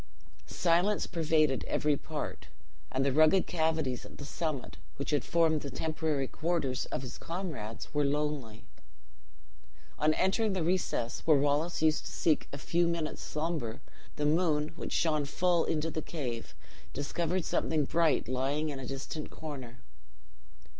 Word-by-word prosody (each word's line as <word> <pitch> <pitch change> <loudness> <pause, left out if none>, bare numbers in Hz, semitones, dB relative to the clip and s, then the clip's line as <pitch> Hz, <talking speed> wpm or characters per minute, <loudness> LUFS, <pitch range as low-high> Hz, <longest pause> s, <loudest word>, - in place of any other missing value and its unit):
Silence 180 +4 +2
pervaded 155 -4 +2
every 150 -1 +2
part; 150 +1 -5 0.4
and 135 +1 +1
the 140 - +3
rugged 155 +6 +5
cavities 160 -6 0
at - - -12
the 145 - -7
summit, 140 - -3 0.2
which - - -3
had 145 - +2
formed 160 -3 +3
the 140 - -5
temporary 155 -3 -1
quarters 155 -6 -1
of - - -3
his 125 - -7
comrades, 155 - -5
were 145 0 +2
lonely. 140 -6 -1 1.3
On 155 +1 +3
entering 200 +3 +2
the 185 -3 0
recess 165 -8 0
where 155 -3 +7
Wallace 145 +4 +1
used 155 -1 +3
to - - -6
seek 155 -3 +1
a 140 - -5
few 170 +4 +1
minutes' 165 -2 -2
slumber, 150 -8 -2 0.4
the 150 - -1
moon, 155 -1 +2
which 170 - -7
shone 155 -3 +2
full 175 +4 +2
into 160 +1 0
the 155 - -2
cave, 125 -10 -5 0.4
discovered 170 +5 -1
something 155 -3 +1
bright 165 -3 +2
lying 135 +5 0
in 140 -2 -4
a 130 - -6
distant 140 +3 -5
corner. 130 -6 -8
155 Hz, 145 wpm, -31 LUFS, 140-165 Hz, 1.3 s, where